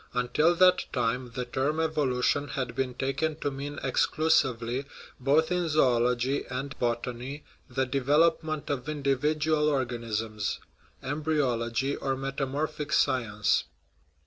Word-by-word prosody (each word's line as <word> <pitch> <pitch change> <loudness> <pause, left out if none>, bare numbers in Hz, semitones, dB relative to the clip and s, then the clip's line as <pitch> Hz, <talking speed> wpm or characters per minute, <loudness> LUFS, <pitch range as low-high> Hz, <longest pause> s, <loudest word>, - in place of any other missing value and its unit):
Until 150 +7 +2
that 185 +1 +5
time 125 0 -1
the 125 -1 -2
term 135 +5 -1
"evolution" 145 -3 +1
had 130 -4 -3
been 130 -2 -2
taken 140 +4 -1
to 145 - 0
mean 140 +1 -5
exclusively, 130 -3 +1 0.3
both 145 +6 +2
in 180 -2 0
zoology 125 -2 +2
and 135 +2 -4
botany, 120 +4 -3 0.3
the 130 +1 0
development 150 +4 +1
of 140 +1 -3
indi 140 -2 +1
vidual 150 +2 +1
organisms 115 -6 -2 0.4
embryology, 135 -3 0
or 135 -1 -2
metamorphic 140 +3 -3
sci 130 -4 +3
ence. 105 -2 +1
135 Hz, 120 wpm, -28 LUFS, 125-150 Hz, 0.4 s, that